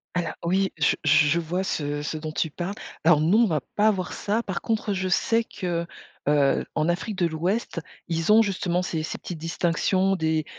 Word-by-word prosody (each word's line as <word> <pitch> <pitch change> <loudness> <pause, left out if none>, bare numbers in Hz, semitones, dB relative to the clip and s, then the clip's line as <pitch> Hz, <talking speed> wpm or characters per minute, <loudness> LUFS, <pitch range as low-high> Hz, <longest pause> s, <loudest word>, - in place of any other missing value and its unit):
Alors 175 -2 -1
oui 190 +3 +1
je 150 - +3
je 155 0 +5
je 170 +4 +2
vois 175 +3 -2
ce 145 -5 -2
ce 155 +1 -3
dont 155 0 -5
tu 160 0 -1
parles. 175 +5 -4 0.3
Alors 160 -2 +5
non, 185 +8 +4
on - - +5
va 155 - 0
pas 210 +1 +4
avoir 185 -4 0
ça. 215 +3 -1
Par 190 -6 -4
contre, 220 -2 -1
je 185 0 -1
sais 225 +5 +2
que, 175 -5 -3 0.4
heu, 145 -2 +3
en 155 +2 +1
Afrique 190 +4 -2
de 175 -2 +1
l'Ouest, 175 +5 -2 0.3
ils 165 +3 0
ont 225 - +7
justement 185 -4 0
ces 160 -3 -2
ces - - -5
petites 175 - -6
distinctions, 180 +4 +1
des, 160 -2 0
175 Hz, 205 wpm, -25 LUFS, 160-195 Hz, 0.4 s, ont